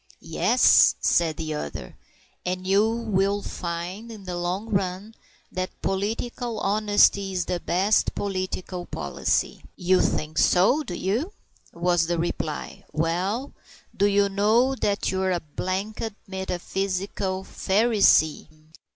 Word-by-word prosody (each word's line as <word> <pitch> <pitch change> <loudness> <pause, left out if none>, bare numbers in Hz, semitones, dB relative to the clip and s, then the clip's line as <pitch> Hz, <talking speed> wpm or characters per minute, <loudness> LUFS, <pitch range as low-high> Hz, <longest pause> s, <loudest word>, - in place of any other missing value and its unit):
"Yes," - - +5
said 165 -3 +2
the 155 -1 -3
other; 70 - -6 0.5
"and 185 +1 -3
you 200 +3 +3
will 205 -3 0
find, 180 +6 -5
in 215 -3 -10
the 180 -1 -5
long 180 +5 -3
run, 195 +2 -2 0.4
that 185 0 -4
political 225 +4 -2
honesty 205 -1 +3
is 180 -2 -1
the 180 - -2
best 195 +5 +1
political 185 -2 -4
policy." 70 -3 -1
"You 185 +1 +2
think 155 +1 -1
so, 195 +12 +4
do 195 -12 -6
you?" 235 - -1 0.4
was 175 -1 +1
the 175 0 0
reply. 160 -2 -4
"Well, 180 - -1 0.4
do 200 - +3
you 200 0 +3
know 215 +6 +3
that 205 -6 -1
you're 190 0 0
a 175 - 0
blanked 195 +7 -4
metaphysical 190 0 -3
Pharisee?" 200 -7 +3
190 Hz, 120 wpm, -25 LUFS, 175-205 Hz, 0.5 s, Yes